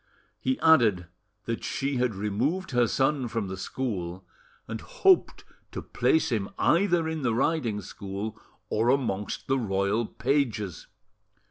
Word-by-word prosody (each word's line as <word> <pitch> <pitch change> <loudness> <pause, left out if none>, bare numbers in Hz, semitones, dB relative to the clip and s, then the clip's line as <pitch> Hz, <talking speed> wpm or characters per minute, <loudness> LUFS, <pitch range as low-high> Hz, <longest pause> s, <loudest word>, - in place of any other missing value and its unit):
He 260 0 -1
added 115 - +5 0.4
that 115 0 -3
she 135 -1 -1
had 125 -4 0
removed 120 - -1
her 120 -2 +3
son 135 +1 +1
from 110 -4 -3
the 95 - -4
school, 95 -4 -4 0.4
and 110 0 -5
hoped 380 -2 +2 0.3
to - - -5
place 160 - +1
him 105 -4 -1
either 175 -2 +3
in 160 -1 -3
the 120 -4 +1
riding 120 -6 0
school 100 +3 -6 0.3
or 110 +3 +1
amongst 115 -7 0
the 135 -1 +1
royal 100 +1 0
pages. 115 - -1
115 Hz, 135 wpm, -27 LUFS, 100-140 Hz, 0.4 s, added